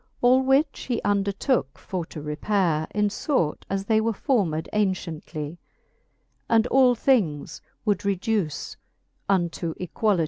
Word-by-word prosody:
All 255 Hz, +2 st, +5 dB
which 275 Hz, +3 st, +1 dB
he 240 Hz, -, +1 dB
undertooke 200 Hz, -, 0 dB
for 180 Hz, -3 st, -4 dB
to 155 Hz, -, -8 dB
repaire, 155 Hz, +1 st, 0 dB
In 210 Hz, 0 st, 0 dB
fort 205 Hz, -, -1 dB
as 195 Hz, 0 st, -2 dB
they 220 Hz, +1 st, +3 dB
were 225 Hz, +1 st, 0 dB
formed 195 Hz, -, 0 dB
aunciently; 175 Hz, -5 st, -2 dB, 0.9 s
And 225 Hz, -1 st, +4 dB
all 255 Hz, -2 st, +5 dB
things 165 Hz, -, +1 dB, 0.2 s
would 205 Hz, -2 st, +1 dB
reduce 200 Hz, -4 st, -1 dB, 0.5 s
unto 170 Hz, -3 st, 0 dB
equality. 195 Hz, +2 st, 0 dB
200 Hz, 125 wpm, -25 LUFS, 165-225 Hz, 0.9 s, All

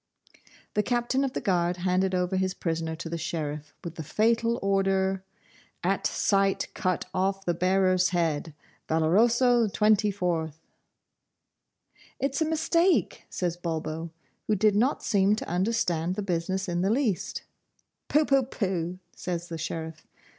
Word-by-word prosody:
The 210 Hz, -, +2 dB
Captain 245 Hz, +4 st, 0 dB
of 265 Hz, -2 st, -2 dB
the -, -, -3 dB
Guard 175 Hz, -2 st, +1 dB
handed 185 Hz, +1 st, +1 dB
over 180 Hz, +1 st, 0 dB
his 185 Hz, 0 st, 0 dB
prisoner 165 Hz, -1 st, -2 dB
to 165 Hz, +1 st, -7 dB
the 165 Hz, 0 st, -4 dB
Sheriff, 150 Hz, -2 st, -4 dB
with 170 Hz, -2 st, -7 dB
the 160 Hz, -, -4 dB
fatal 230 Hz, +7 st, +1 dB
order, 195 Hz, -1 st, +1 dB, 0.6 s
'AT -, -, +1 dB
SIGHT 195 Hz, -1 st, +1 dB
CUT 185 Hz, -3 st, -1 dB
OFF 195 Hz, +1 st, 0 dB
THE 175 Hz, -, +1 dB
BEARER'S 185 Hz, +1 st, +2 dB
HEAD. 165 Hz, -3 st, -1 dB, 0.3 s
'VALOROSO 230 Hz, +9 st, +3 dB
XXIV.' 195 Hz, -7 st, +1 dB, 1.7 s
'It's 275 Hz, +2 st, -1 dB
a -, -, +4 dB
mistake,' 335 Hz, +3 st, +1 dB
says 175 Hz, -2 st, -2 dB
Bulbo, 160 Hz, -1 st, -4 dB, 0.4 s
who 215 Hz, -, +2 dB
did 210 Hz, +1 st, +3 dB
not 245 Hz, +7 st, +1 dB
seem 200 Hz, -1 st, +3 dB
to -, -, -6 dB
understand 180 Hz, -2 st, 0 dB
the 210 Hz, -, -3 dB
business 190 Hz, +1 st, -1 dB
in 175 Hz, 0 st, -1 dB
the 190 Hz, -, +1 dB
least. 225 Hz, -5 st, 0 dB, 0.6 s
'Poo 300 Hz, +1 st, +3 dB
poo 275 Hz, -1 st, +4 dB
pooh,' 185 Hz, -8 st, -2 dB, 0.2 s
says 175 Hz, -1 st, -4 dB
the 165 Hz, -1 st, -5 dB
Sheriff. 160 Hz, 0 st, -5 dB
185 Hz, 140 wpm, -27 LUFS, 170-215 Hz, 1.7 s, a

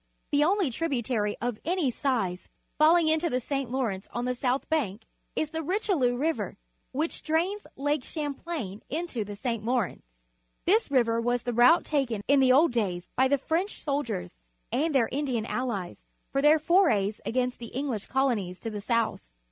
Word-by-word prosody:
The 290 Hz, 0 st, +4 dB
only 370 Hz, -3 st, +2 dB
tributary 240 Hz, -7 st, -1 dB
of 240 Hz, -2 st, -2 dB
any 335 Hz, -5 st, +1 dB
size 225 Hz, -10 st, -1 dB, 0.3 s
falling 325 Hz, +2 st, +6 dB
into 320 Hz, +2 st, +2 dB
the 250 Hz, -, 0 dB
St. 275 Hz, 0 st, -3 dB
Lawrence 230 Hz, -7 st, -2 dB
on 240 Hz, +1 st, -3 dB
the 250 Hz, -, 0 dB
south 250 Hz, +1 st, -1 dB
bank 245 Hz, -10 st, -1 dB, 0.3 s
is 310 Hz, -1 st, -1 dB
the 320 Hz, -1 st, -2 dB
Richelieu 325 Hz, -, +1 dB
River, 315 Hz, +4 st, -1 dB, 0.3 s
which 305 Hz, +5 st, -2 dB
drains 350 Hz, +6 st, -1 dB
Lake 290 Hz, 0 st, 0 dB
Champlain 290 Hz, -, -5 dB
into 310 Hz, -7 st, -2 dB
the 205 Hz, 0 st, -7 dB
St. 230 Hz, 0 st, -3 dB
Lawrence. 240 Hz, -3 st, -1 dB, 0.6 s
This 425 Hz, +2 st, +3 dB
river 230 Hz, -4 st, +2 dB
was 245 Hz, +1 st, 0 dB
the 245 Hz, -, -2 dB
route 245 Hz, +8 st, +6 dB
taken 250 Hz, -8 st, -1 dB
in 280 Hz, 0 st, +5 dB
the 260 Hz, -1 st, +5 dB
old 295 Hz, +5 st, +5 dB
days 185 Hz, -7 st, -2 dB
by 260 Hz, +1 st, +4 dB
the 280 Hz, +2 st, +3 dB
French 335 Hz, +9 st, -2 dB
soldiers 275 Hz, -, -2 dB, 0.4 s
and 305 Hz, +2 st, 0 dB
their 235 Hz, -4 st, +4 dB
Indian 260 Hz, -5 st, -1 dB
allies 225 Hz, -8 st, -3 dB, 0.3 s
for 275 Hz, -, +1 dB
their 300 Hz, +2 st, +6 dB
forays 300 Hz, -, +2 dB
against 250 Hz, 0 st, -1 dB
the 235 Hz, -, -7 dB
English 250 Hz, -4 st, -3 dB
colonies 230 Hz, -10 st, 0 dB
to 225 Hz, -, -4 dB
the 210 Hz, -1 st, -5 dB
south. 230 Hz, +1 st, 0 dB
260 Hz, 170 wpm, -28 LUFS, 230-310 Hz, 0.6 s, falling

